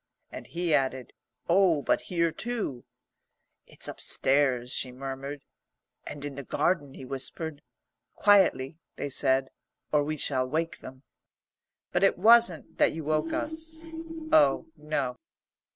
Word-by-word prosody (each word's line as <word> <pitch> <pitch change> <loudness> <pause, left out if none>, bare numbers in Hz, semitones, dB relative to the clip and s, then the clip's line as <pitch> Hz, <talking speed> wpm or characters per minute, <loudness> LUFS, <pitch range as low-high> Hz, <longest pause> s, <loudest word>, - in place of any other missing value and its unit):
And - - -8
he 170 -1 -1
added, 130 -3 0 0.3
"Oh, 175 -4 +4
but - - +2
here 170 -2 +1
too!" 215 - -4 0.8
"It's - - -5
upstairs," 130 -3 +1
she 130 0 -3
murmured. 135 +2 -6 0.6
"And 145 -1 -6
in 145 - -5
the 140 +1 -7
garden," 145 0 0
he 130 - -9
whispered. 140 +3 -5 0.5
"Quietly," 180 -8 +4 0.2
they 145 - -4
said, 135 -1 +1 0.4
"or 150 -1 +3
we 155 +1 -3
shall 130 -2 +1
wake 165 +3 -2
them." 130 +1 -11 0.9
But 175 - +1
it 195 - +4
wasn't 220 -4 +4
that - - +4
you 160 - -5
woke 155 +2 0
us. 320 +1 -2 0.5
Oh, 310 -2 +5
no. 140 -5 -2
150 Hz, 130 wpm, -28 LUFS, 135-175 Hz, 0.9 s, Oh